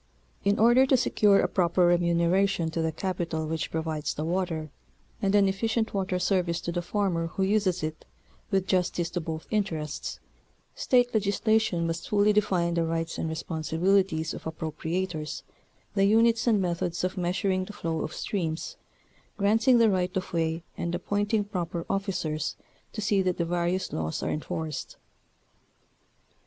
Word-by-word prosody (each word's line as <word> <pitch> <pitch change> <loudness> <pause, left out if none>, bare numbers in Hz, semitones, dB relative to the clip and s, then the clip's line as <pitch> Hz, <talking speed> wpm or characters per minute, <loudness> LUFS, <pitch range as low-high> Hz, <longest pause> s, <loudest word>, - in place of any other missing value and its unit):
In 200 +1 +2
order 240 +4 +5
to 265 - +5
secure 210 -5 +4
a - - +2
proper 175 -1 +2
remunera 175 +3 +2
tion 165 -4 -2
to 165 - -1
the 160 0 0
capital 170 -2 -2
which 160 0 -2
provides 160 -2 -2
the 155 - -3
water, 165 -3 -2 0.5
and 195 0 +2
an 200 -1 +5
efficient 220 +3 0
water 190 -2 -1
service 180 -2 +1
to 170 - -3
the 175 0 -1
farmer 175 -2 -1
who 190 +3 -2
uses 190 -4 +1
it 155 0 -4 0.5
with 195 -2 +1
justice 180 -2 0
to 175 - -2
both 160 0 -5
interests, 165 -8 -2 0.5
State 245 -1 +2
legislation 215 -3 +1
must 165 0 -3
fully 210 0 +4
define 185 -5 +1
the 170 -1 +1
rights 165 0 -2
and 160 - -1
responsibilities 160 +2 0
of - - -9
appropriators, 160 +1 -3 0.5
the 195 -1 +3
units 225 +3 +4
and 220 -3 +4
methods 175 -1 -1
of 185 - -1
meas 180 0 -1
uring 185 -2 0
the 210 - -8
flow 165 -5 -3
of - - -3
streams, 165 -5 -3 0.6
granting 225 +5 +4
the 230 -2 +5
right 180 -1 0
of 185 0 -4
way 165 0 0
and 170 0 -2
appointing 205 +4 0
proper 175 -4 -4
officers 180 -6 -2 0.4
to 215 - -5
see 200 -1 +2
that 185 -1 0
the 170 - 0
various 175 +2 -1
laws 80 0 -2
are - - -1
enforced. 155 -1 -4
180 Hz, 160 wpm, -27 LUFS, 165-200 Hz, 0.6 s, order